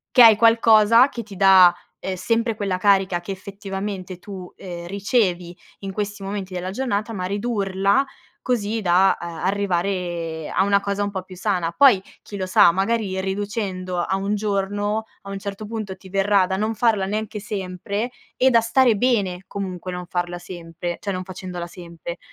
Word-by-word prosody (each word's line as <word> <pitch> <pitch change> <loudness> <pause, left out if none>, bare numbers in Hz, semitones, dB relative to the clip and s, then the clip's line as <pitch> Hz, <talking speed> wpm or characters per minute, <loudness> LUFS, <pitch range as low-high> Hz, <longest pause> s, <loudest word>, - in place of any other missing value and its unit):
che 250 - +9
hai 225 -2 +9
qualcosa 230 +2 +6
che 235 -4 -6
ti 200 -3 -12
dà, 185 -2 +7 0.2
ehm, 190 -1 -4
sempre 230 +4 0
quella 200 -3 -2
carica 190 -2 +2
che 195 - -5
effettivamente 195 -1 -6
tu, 185 -2 -9
ehm, 175 -2 -8
ricevi 185 -3 0 0.2
in 195 -1 -5
questi 205 -1 -4
momenti 195 -1 -5
della 185 +1 -4
giornata, 225 -1 -2
ma 185 -3 -3
ridurla 200 +1 +1 0.4
così 225 -3 -1
da, 185 +1 +4
ehm, 175 - -6
arrivare 175 -4 -2
a - - +3
una 200 0 +3
cosa 200 0 -2
un 205 - -1
po' 190 -2 -4
più 185 - -12
sana. 180 -3 -1
Poi, 250 -7 +5 0.2
chi 205 - -9
lo 190 - -2
sa, 180 -2 +5
magari 195 0 0
riducendo 190 -2 -3
a 190 +2 0
1 195 +2 -1
giorno, 205 +1 -1 0.2
a 195 - -9
un 195 - -4
certo 200 +1 -6
punto 210 -3 -5
ti 190 0 -15
verrà 195 -1 +3
da 190 - -2
non 220 +2 -1
farla 220 -4 +2
neanche 215 +1 -3
sempre 200 +2 -4 0.3
e 260 +1 +4
da 235 -2 +5
stare 230 0 +3
bene, 200 -6 0
comunque, 185 -2 -5
non 180 0 -5
farla 175 0 -3
sempre 175 -1 -6
cioè 200 - -3
non 185 0 -4
facendola 180 -2 -6
sempre. 170 0 -9
195 Hz, 175 wpm, -22 LUFS, 185-210 Hz, 0.4 s, che